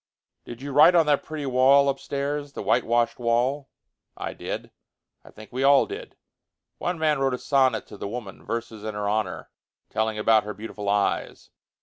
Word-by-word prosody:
"Did 120 Hz, +2 st, -9 dB
you 140 Hz, -, -5 dB
write 150 Hz, +5 st, +7 dB
on 165 Hz, -2 st, +5 dB
that 145 Hz, -1 st, +2 dB
pretty 155 Hz, -2 st, -6 dB
wall 135 Hz, +2 st, +5 dB
upstairs, 140 Hz, +1 st, -3 dB
the -, -, -6 dB
whitewashed 120 Hz, +1 st, +1 dB
wall?" 125 Hz, +4 st, 0 dB, 0.5 s
"I -, -, -5 dB
did; -, -, -6 dB, 0.5 s
I -, -, -15 dB
think 110 Hz, +2 st, -14 dB
we 130 Hz, -, -2 dB
all 140 Hz, 0 st, +5 dB
did. -, -, -8 dB, 0.6 s
One 175 Hz, 0 st, -2 dB
man 155 Hz, -2 st, +1 dB
wrote 135 Hz, -2 st, +1 dB
a -, -, -6 dB
sonnet 130 Hz, -3 st, +1 dB
to 105 Hz, -, -12 dB
the 100 Hz, -, -5 dB
woman, 100 Hz, -8 st, -7 dB
verses 115 Hz, +1 st, -5 dB
in 110 Hz, -1 st, -5 dB
her 105 Hz, 0 st, -2 dB
honor, 110 Hz, +1 st, -2 dB, 0.4 s
telling 110 Hz, 0 st, -1 dB
about 110 Hz, 0 st, +4 dB
her 105 Hz, 0 st, -6 dB
beautiful 105 Hz, -1 st, -6 dB
eyes. 100 Hz, 0 st, -1 dB
125 Hz, 180 wpm, -25 LUFS, 110-140 Hz, 0.6 s, write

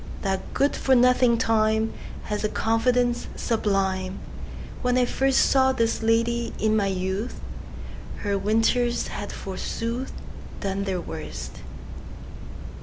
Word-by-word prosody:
That 190 Hz, -1 st, -2 dB
good 280 Hz, +1 st, +2 dB
for 265 Hz, -, +3 dB
nothing 250 Hz, -1 st, +5 dB
TimeHas 220 Hz, -1 st, -1 dB
a 215 Hz, -, +1 dB
confidence 240 Hz, +2 st, +1 dB
sublime! 195 Hz, -4 st, 0 dB, 0.6 s
When 250 Hz, -1 st, +2 dB
I 250 Hz, -, +4 dB
firstSaw 265 Hz, 0 st, +3 dB
this 230 Hz, 0 st, +1 dB
lady, 230 Hz, +1 st, +1 dB
in 215 Hz, 0 st, +2 dB
my 205 Hz, -2 st, +2 dB
youth, 190 Hz, +4 st, -2 dB, 0.8 s
Her 200 Hz, -1 st, 0 dB
winters 225 Hz, +4 st, +1 dB
had, 205 Hz, -, -5 dB
forsooth, 230 Hz, +6 st, -4 dB, 0.5 s
Done 195 Hz, 0 st, -2 dB
their 190 Hz, -2 st, -1 dB
worst. 60 Hz, -, -7 dB
225 Hz, 110 wpm, -25 LUFS, 200-245 Hz, 0.8 s, nothing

